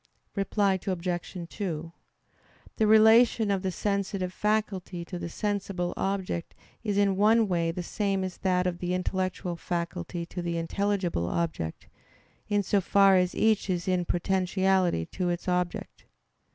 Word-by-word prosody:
Reply 195 -1 +1
Obj. 175 -1 -3
2: 165 -4 -4 0.8
The 215 - +3
relation 220 0 +6
of 195 -1 0
the 190 - -1
sensitive 195 -1 -2
faculty 195 -5 -1
to 180 0 -6
the 170 0 -5
sensible 195 -2 -2
object 190 -3 -2 0.3
is 205 -3 -1
in 200 -2 +3
one 220 +2 +4
way 170 -3 +1
the 175 +2 -3
same 195 0 -1
as 185 -1 -5
that 180 -1 +1
of 175 -1 -1
the 180 0 -1
intellectual 185 -1 -2
faculty 170 0 -4
to 180 +1 -6
the 170 -1 -2
intelligible 175 - -1
object, 155 - -3 0.6
in 205 -1 +2
so 200 +1 +2
far 195 +1 +5
as 180 -1 +2
each 215 -2 +2
is 175 -1 -1
in 180 -1 +1
potentiality 185 - +1
to 180 - -2
its 175 +1 -3
object. 180 -1 -2
185 Hz, 145 wpm, -28 LUFS, 175-200 Hz, 0.8 s, relation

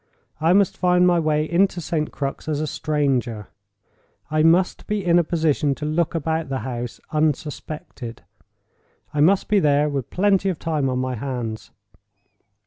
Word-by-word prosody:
I 160 +2 +3
must 200 -1 +3
find 180 0 +3
my 175 -1 +4
way 155 -1 +1
into 180 +2 +2
St. 155 -2 -2
Crux 140 +1 -4
as 150 -2 -1
a 155 - -1
stranger—I 120 -4 -3
must 170 +3 +3
be 210 -3 -2
in 175 0 +5
a - - +3
position 155 -4 +1
to 150 - -6
look 160 +2 0
about 160 -1 -1
the 135 -1 -2
house, 120 -2 -5
unsuspected—I 150 -2 -5
must 185 +5 +4
be 210 - +3
there 150 -2 +3
with 135 -4 -3
plenty 195 0 +2
of 180 - -2
time 150 -5 -1
on 130 - -1
my 130 0 -1
hands. 120 -3 -5
155 Hz, 150 wpm, -22 LUFS, 135-170 Hz, -, in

